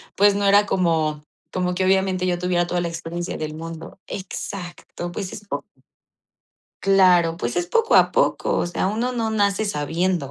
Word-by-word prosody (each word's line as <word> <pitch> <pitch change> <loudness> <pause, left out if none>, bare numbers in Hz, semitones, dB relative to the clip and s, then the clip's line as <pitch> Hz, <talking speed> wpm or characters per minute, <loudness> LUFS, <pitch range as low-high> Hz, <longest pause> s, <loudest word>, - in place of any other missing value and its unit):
pues, 200 0 +5
no 200 0 0
era 205 +1 +5
como 160 -5 0 0.3
como 180 -1 -1
que 185 - 0
obviamente 190 -1 +2
yo 175 -1 0
tuviera 175 -1 +1
toda 175 0 -1
la 175 - -1
experiencia 170 +2 -5
del 155 0 -5
mundo. 165 +2 -8
Exacto, 175 -2 -6
pues, 185 +1 -5
es 205 - -9
po - - -2 1.2
Claro, 180 -4 +4
pues 120 -5 -3
es 175 0 -1
poco 460 0 +2
a - - +6
poco, - - +1
o - - 0
sea, 175 +2 -1
uno 235 +5 -1
no 225 -2 -1
nace 205 -1 +1
sabiendo, 170 -3 -1
180 Hz, 175 wpm, -22 LUFS, 170-195 Hz, 1.2 s, a